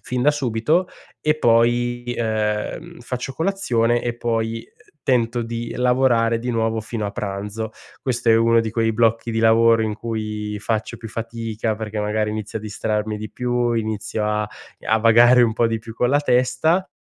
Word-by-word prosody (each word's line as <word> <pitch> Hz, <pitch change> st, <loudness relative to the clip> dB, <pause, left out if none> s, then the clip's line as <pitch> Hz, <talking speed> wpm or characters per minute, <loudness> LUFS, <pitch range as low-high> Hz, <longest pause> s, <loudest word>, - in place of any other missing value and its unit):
fin 125 Hz, -1 st, -3 dB
da 150 Hz, -, +5 dB
subito 145 Hz, +5 st, 0 dB, 0.3 s
e 150 Hz, -, +2 dB
poi, 120 Hz, 0 st, +2 dB
ehm, 110 Hz, +9 st, -2 dB
faccio 125 Hz, +2 st, -5 dB
colazione, 120 Hz, -10 st, 0 dB
e 120 Hz, -1 st, -2 dB
poi 115 Hz, -1 st, -2 dB, 0.4 s
tento 120 Hz, -2 st, +1 dB
di 115 Hz, 0 st, -5 dB
lavorare 125 Hz, -2 st, +2 dB
di 125 Hz, +2 st, -3 dB
nuovo 115 Hz, -1 st, 0 dB
fino 110 Hz, -1 st, -4 dB
a -, -, -3 dB
pranzo. 105 Hz, +2 st, -4 dB, 0.3 s
Questo 125 Hz, -3 st, -2 dB
è 115 Hz, -, +6 dB
uno 115 Hz, 0 st, +4 dB
di 110 Hz, -, -3 dB
quei 115 Hz, 0 st, +1 dB
blocchi 115 Hz, +1 st, +1 dB
di 110 Hz, -, -1 dB
lavoro 115 Hz, 0 st, +5 dB
in 110 Hz, -1 st, -1 dB
cui 105 Hz, -2 st, -4 dB
faccio 110 Hz, 0 st, -2 dB
più 115 Hz, -, -9 dB
fatica, 115 Hz, 0 st, -3 dB
perché 110 Hz, 0 st, -5 dB
magari 105 Hz, 0 st, 0 dB
inizio 110 Hz, 0 st, -4 dB
a -, -, -11 dB
distrarmi 105 Hz, 0 st, -2 dB
di 110 Hz, -1 st, -7 dB
più, 120 Hz, +1 st, 0 dB
inizio 110 Hz, -1 st, -2 dB
a 105 Hz, 0 st, -1 dB, 0.4 s
a 110 Hz, +1 st, +3 dB
vagare 120 Hz, +2 st, +6 dB
un 115 Hz, -, +3 dB
po' 115 Hz, +1 st, +2 dB
di 115 Hz, 0 st, -1 dB
più 115 Hz, 0 st, -10 dB
con 125 Hz, +2 st, +1 dB
la 145 Hz, -, +3 dB
testa. 145 Hz, +7 st, +2 dB
115 Hz, 175 wpm, -21 LUFS, 110-120 Hz, 0.4 s, è